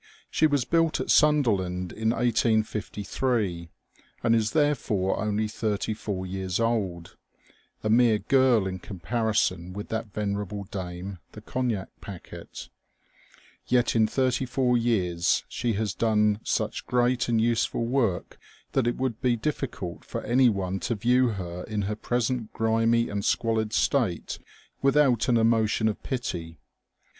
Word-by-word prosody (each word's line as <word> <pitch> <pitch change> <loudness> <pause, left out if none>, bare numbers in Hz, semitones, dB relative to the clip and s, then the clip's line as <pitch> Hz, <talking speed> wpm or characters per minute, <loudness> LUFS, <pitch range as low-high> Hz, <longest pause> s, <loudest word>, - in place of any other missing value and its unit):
She 155 - +4
was 145 -4 +1
buUt 165 -1 +2
at - - -1
Sunderland 100 - +2
in 110 0 -1
1853, 110 -4 0 0.5
and 115 -1 +4
is 110 -1 +2
therefore 135 -11 +1
only 105 +1 0
thirty 110 0 -2
four 100 -3 -4
years 95 0 -3
old, 100 -7 -1 0.7
a 110 - 0
mere 115 -1 +5
girl 130 -3 +3
in 95 -1 -4
comparison 95 -2 -1
with 105 +1 -7
that 110 -1 -3
venerable 100 0 -3
dame, 95 -1 -6
the - - -10
Cognac 120 -7 -2
Packet 95 -4 -9 1.0
Yet 125 -1 +2
in 110 -1 +4
thirty 130 +1 0
four 125 -1 +1
years 95 -8 +1
she 120 -2 -2
has 105 -1 -1
done 105 -2 +2
such - - -2
great 125 0 +1
and 115 -1 +2
useful 115 0 +1
work 115 -7 -1 0.3
that 130 -3 +1
it 120 - 0
would 130 -4 -2
be 125 -2 +2
diflBcult 115 - -4
for - - -5
any 125 +2 +4
one 95 -2 -2
to 115 - -2
view 125 +4 +3
her 90 -5 -4
in 105 -1 -2
her 105 +2 -2
present 120 0 -1
grimy 115 +1 +2
and 100 -1 -3
squalid 110 -1 0
state 110 -8 0 0.4
without 135 -4 +3
an 120 - +4
emotion 110 -1 +2
of 110 - -2
pity. 85 - -4
110 Hz, 140 wpm, -26 LUFS, 100-120 Hz, 1.0 s, mere